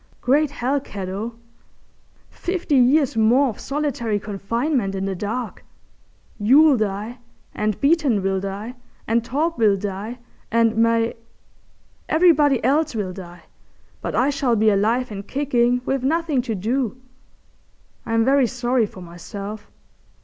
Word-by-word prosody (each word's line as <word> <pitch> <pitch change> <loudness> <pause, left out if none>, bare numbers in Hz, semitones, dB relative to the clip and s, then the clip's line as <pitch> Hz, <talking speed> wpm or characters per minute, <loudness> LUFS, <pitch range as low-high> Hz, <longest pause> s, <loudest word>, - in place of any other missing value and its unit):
Great 290 +4 +2
hell, 275 0 -1
cat 200 -8 -7
O! 215 +5 -5 1.0
fifty 355 -4 -3
years 265 +1 +4
more 240 +5 +4
of 220 - -8
solitary 265 -7 -2
confinement 215 +2 -2
in 190 0 -2
the 195 - -2
dark! 220 +5 -4 0.8
You'll 275 +8 +6
die, 215 +2 -3 0.3
and 210 -1 -2
Beeton 280 - +2
will 195 0 0
die, 200 +5 -5 0.3
and 230 +1 +1
Torp 305 +5 -1
will 210 -3 +4
die, 205 +4 -5 0.3
and 230 0 +3
Mai—everybody 235 +6 0
else 290 +2 +1
will 195 -4 -3
die, 175 -2 -11 0.6
but - - -4
I 265 +4 +2
shall 265 -4 +1
be 215 0 +3
alive 225 +5 +1
and 200 -1 -7
kicking 250 -3 +1
with 270 -1 -1
nothing 310 -1 +1
to 220 - 0
do. 235 +4 -1 1.1
I'm 225 0 +1
very 270 -1 +4
sorry 245 -2 0
for 190 - -12
myself. 200 +5 -8
230 Hz, 130 wpm, -22 LUFS, 205-270 Hz, 1.1 s, You'll